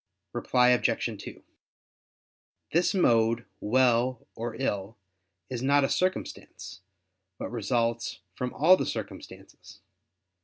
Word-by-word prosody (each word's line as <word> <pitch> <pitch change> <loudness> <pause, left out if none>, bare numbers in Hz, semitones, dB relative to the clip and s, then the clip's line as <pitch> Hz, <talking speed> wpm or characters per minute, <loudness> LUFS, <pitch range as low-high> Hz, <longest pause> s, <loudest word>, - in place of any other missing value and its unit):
Reply 125 -1 +3
Obj. 125 -1 +1
2: - - -10 1.3
This 175 +4 +2
mode 115 -8 +3
"well" 125 +1 +2
or 115 0 -5
"ill" 105 -5 -3 0.5
is 125 -2 -5
not 140 +2 +3
a 135 - +1
circumstance, 95 - -3 0.6
but - - -6
results 115 +1 -1
from 125 -1 -4
all 170 +6 +6
the - - -3
circumstances. - - -8
120 Hz, 105 wpm, -28 LUFS, 115-130 Hz, 1.3 s, all